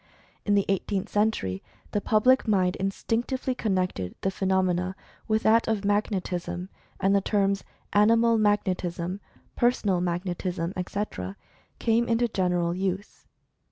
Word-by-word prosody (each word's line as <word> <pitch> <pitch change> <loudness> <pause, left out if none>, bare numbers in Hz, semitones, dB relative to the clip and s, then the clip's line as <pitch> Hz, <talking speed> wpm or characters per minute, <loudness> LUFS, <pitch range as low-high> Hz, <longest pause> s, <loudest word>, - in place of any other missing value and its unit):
in 205 - +3
the 200 - +3
Eighteenth 195 0 -1
Century, 205 - 0 0.3
the 205 - 0
public 245 +5 +3
mind 185 -4 +2
instinctively 235 +7 -1
connected 185 - -1
the 190 - 0
phenomena 185 -1 0 0.3
with 220 0 +1
that 225 +1 +4
of 210 -3 0
Magnetism, 190 -3 -1 0.3
and 195 +1 +3
the 200 - +3
terms 200 -1 +1 0.3
"Animal 230 +2 +4
Mag 210 -1 +3
netism," 180 0 -3 0.4
"Personal 210 -7 +2
Magnetism," 175 0 -2
etc., 180 - -4 0.4
came 230 +1 +2
into 235 +1 +2
gen 190 -5 0
eral 175 -1 0
use. 190 +2 -4
195 Hz, 125 wpm, -26 LUFS, 180-215 Hz, 0.4 s, that